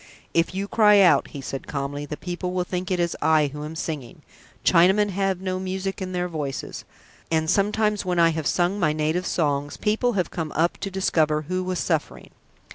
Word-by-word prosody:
"If 170 +2 +1
you 195 +1 -2
cry 210 -1 +5
out," 170 -8 +5
he 140 - -8
said 135 0 -6
calmly, 145 +1 -4
"the 150 - -5
people 180 0 -4
will 180 -1 0
think 180 +1 -4
it 185 -2 0
is 170 -1 0
I 155 -3 +3
who 150 0 -6
am 155 +2 -6
singing! 150 -7 -5 0.4
Chinamen 190 +4 +4
have 195 -1 -1
no 185 -1 -2
music 190 +1 -4
in 185 -1 -4
their 180 -1 -1
voices, 150 -5 -5 0.4
and 160 -1 +1
sometimes 210 +3 +1
when 180 -1 -1
I 165 -1 +5
have 160 -2 -2
sung 180 +3 +1
my 155 -5 +2
native 155 +4 -1
songs, 145 -3 -1
people 225 +3 +1
have 185 -4 -1
come 160 -3 -4
up 170 +2 +1
to 200 - -3
discover 155 -5 +1
who 185 +4 -2
was 185 0 -2
suffering." 160 -4 -2
175 Hz, 200 wpm, -24 LUFS, 155-190 Hz, 0.4 s, cry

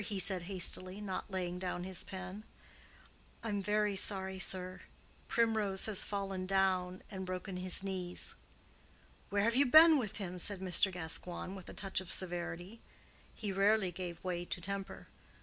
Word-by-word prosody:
he 205 -1 -3
said 190 0 +2
hastily, 185 0 +2
not 205 0 -4
laying 180 -2 -3
down 180 -1 -3
his 185 -1 -3
pen. 190 +2 -7 1.0
"I'm 205 -3 -1
very 210 +1 +1
sorry, 190 -1 +1
sir; 185 0 -1 0.5
Primrose 220 -4 +2
has 215 -3 0
fallen 195 -2 -3
down 185 -1 +1
and 190 -2 -5
broken 185 +1 -5
his 185 +1 0
knees." 185 -2 -4 1.0
"Where 200 0 +1
have 230 +2 +2
you 275 +1 +4
been 315 +3 +9
with 215 -4 -4
him?" 180 -3 -5
said 200 +2 +4
Mr. 190 +1 +2
Gascoigne, 175 +1 -3
with 190 -2 -9
a - - -9
touch 195 -1 -1
of 185 - -6
severity. 175 +3 0 0.5
He 210 -3 -4
rarely 195 0 +3
gave 175 -1 -6
way 175 -2 -2
to 175 - -4
temper. 195 +2 -5
190 Hz, 155 wpm, -34 LUFS, 180-200 Hz, 1.0 s, been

